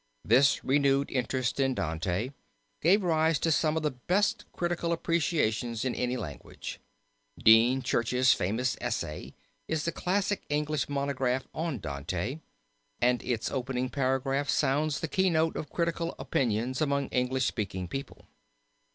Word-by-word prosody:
This 135 +1 +4
renewed 140 0 +2
interest 130 0 -1
in 135 -1 +2
Dante 90 - -2 0.5
gave 190 +6 +4
rise 160 -2 +2
to 165 - 0
some 155 0 +2
of 160 - -1
the 150 - +1
best 205 - 0
critical 175 -1 -1
appreciations 145 -9 0
in 130 - 0
any 125 0 -1
language. 75 - -7 0.6
Dean 120 +4 +5
Church's 125 -1 +3
famous 115 +7 0
essay 75 - -4 0.3
is 160 -2 -1
the 170 - 0
classic 195 +3 0
English 150 0 -1
monograph 135 -2 -1
on 160 -4 -2
Dante, 85 - -4 0.6
and 125 0 +2
its 115 -3 -2
opening 130 -1 -2
paragraph 135 +1 0
sounds 145 +1 +1
the 165 - -1
keynote 165 -2 +2
of 150 - -5
critical 170 0 -1
opinion 120 0 0
among 140 -2 +1
English 125 0 0
speaking 95 -4 -2
people. 135 +8 -7
135 Hz, 135 wpm, -29 LUFS, 125-155 Hz, 0.6 s, Dean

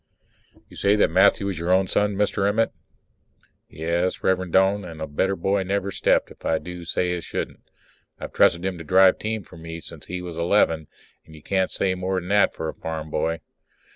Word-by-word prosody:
You - - -16
say 100 +1 +3
that 105 - +3
Matthew 100 +2 +4
is 90 -5 -4
your 85 +1 -3
own 95 +1 +4
son, 105 +2 +1
Mr. 100 0 +1
Emmett? 115 +2 +1 1.0
Yes, 85 +4 -2
Rev'rend 95 -2 +1
Doane, 95 +2 +3
and 85 -3 -9
a 80 - -3
better 95 +7 0
boy 95 +2 0
never 100 +1 -1
stepped, 90 - +1
if - - -16
I 80 - +1
do 90 0 -8
say 90 +2 -1
it 90 - -1
as 85 - -7
shouldn't. - - -5 0.6
I've - - -7
trusted 85 +2 +3
him 95 -3 -3
to - - -7
drive 95 +3 +5
team 110 -1 -3
for 80 - -15
me 80 0 -7
since - - -10
he 90 0 -5
was 85 -2 -7
eleven, 85 -3 +2 0.4
and 80 - -14
you 75 - -15
can't 95 -1 0
say 95 -1 0
more 95 +1 -1
than 90 0 -9
that 105 0 +3
for 80 - -4
a - - -4
farm 80 -1 -6
boy. 80 +1 -1
90 Hz, 210 wpm, -24 LUFS, 85-95 Hz, 1.0 s, drive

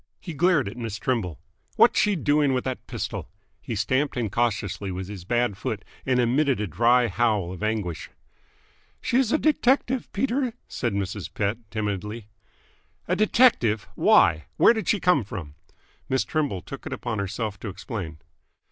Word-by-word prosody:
He 170 - -7
glared 160 - +3
at 105 +4 -7
Miss 115 -3 -4
Trimble. 100 - -1 0.4
"What's - - +5
she 210 -1 +3
doing 145 -4 +2
with 125 - -1
that 130 -1 -5
pistol?" - - -5 0.3
He 115 - -4
stamped 130 +8 0
incautiously 105 -4 -1
with 95 0 -4
his 95 -3 -8
bad 120 -1 0
foot, - - -4 0.2
and 125 -1 +3
emitted 130 +2 +2
a 105 - 0
dry 120 +7 +3
howl 105 -4 +1
of 95 - -8
anguish. 105 -6 -2 0.9
"She 240 - 0
is 260 -4 +2
a - - +4
detective, 265 -4 +1
Peter," 255 +2 0
said 120 -5 -2
Mrs. 100 -1 -3
Pett 105 +2 -1
timidly. 105 0 -3 0.8
"A 180 - +1
detective? 205 - +3
Why? 80 - +4
Where - - +7
did 220 -6 -4
she 210 - +2
come 180 -8 +3
from?" 90 -8 -7 0.6
Miss 130 0 +2
Trimble 145 - -2
took - - -8
it - - -4
upon 115 -3 -3
herself 100 +1 -3
to 110 - -5
explain. 95 - -6
115 Hz, 160 wpm, -25 LUFS, 100-150 Hz, 0.9 s, Where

